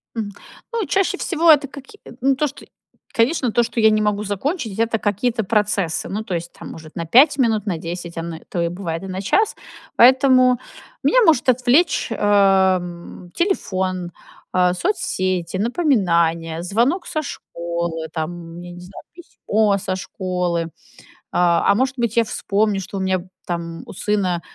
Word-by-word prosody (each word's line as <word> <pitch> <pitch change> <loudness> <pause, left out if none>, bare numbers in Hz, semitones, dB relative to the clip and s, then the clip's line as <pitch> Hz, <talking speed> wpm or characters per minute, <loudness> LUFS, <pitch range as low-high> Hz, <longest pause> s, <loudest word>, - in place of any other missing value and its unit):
Мгм. 215 -3 -3 0.4
Ну, 455 -3 -1
чаще 385 0 +1
всего 335 -3 +3
это 290 -2 +4
каки 280 +9 -13
э, - - -11
ну, 270 +1 +3
то, 300 +3 +1
что 280 - -11 0.5
конечно, 250 +1 +1
то, 240 - +3
что 235 0 -3
я 220 -1 +6
не 215 0 +2
могу 210 0 0
закончить 220 - -3
это 230 0 +1
какие-то 220 +3 0
процессы, 205 -5 0
ну, 210 +3 -3
то 190 -5 -3
есть, 170 0 -5
там, - - -10
может, 160 -1 -11
на 170 - -3
5 275 - +5
минут, 220 -5 +2
на 190 -5 -1
10, 170 +1 -6
оно, 165 0 -4
то 175 - -2
и 170 - +1
бывает 170 -2 -4
и - - -6
на 185 0 -4
час. 415 - +1 0.4
Поэтому 255 0 +5 0.4
меня - - +3
может 285 -7 +4
отвлечь, 255 +7 +3
эм, 190 -4 +1
телефон, 185 - -1 0.4
э, 180 -1 +3
соцсети, 185 - -1
напоминания, 170 - +1
звонок 240 - 0
со 310 - -2
школы, 170 - -5
там, 170 +1 -5
я 175 0 -9
не 175 - -11
знаю, 180 +2 -11
письмо 220 - 0
со 185 0 -3
школы, 180 -2 -2
э, - - -8 0.6
а 175 +2 +3
может 260 +3 0
быть, 235 -2 -1
я 230 - +4
вспомню, 205 -1 0
что 195 - -7
у - - -2
меня, 190 -1 -1 0.2
там, 170 -1 -4
у - - -10
сына, 185 -3 -1
200 Hz, 165 wpm, -20 LUFS, 175-250 Hz, 0.6 s, я